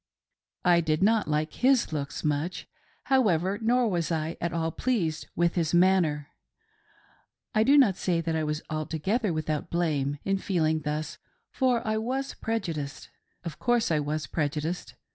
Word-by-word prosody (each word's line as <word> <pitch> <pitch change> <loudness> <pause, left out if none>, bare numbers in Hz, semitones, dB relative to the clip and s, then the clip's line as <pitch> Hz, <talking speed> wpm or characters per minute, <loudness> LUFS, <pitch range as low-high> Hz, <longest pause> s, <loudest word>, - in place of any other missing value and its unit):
I 175 -1 +5
did 155 +2 0
not 220 0 +3
like 155 +1 -1
his 255 -8 +2
looks 140 -2 -4
much, 150 +4 -2 0.4
however, 200 -7 +2
nor 240 +2 +3
was 175 -5 -1
I 160 0 -1
at 170 - -1
all 165 -1 -1
pleased 170 -9 -1
with 170 0 +2
his 170 -1 0
manner. 175 -5 +3 1.2
I 215 - +3
do 275 +6 +5
not 220 -10 +5
say 175 -3 0
that 165 -1 -1
I 160 - 0
was 150 0 -2
altogether 160 - -1
without 155 0 -2
blame 150 -5 0
in 195 0 0
feeling 160 -5 +1
thus, 150 +1 -4 0.3
for 250 -4 +1
I 215 0 +1
was 265 +4 -2
prejudiced. 155 -11 -4 0.3
Of 165 -3 -7
course 240 -5 +1
I 155 - +3
was 150 +1 -2
prejudiced. 155 +3 -3
170 Hz, 155 wpm, -27 LUFS, 155-215 Hz, 1.2 s, I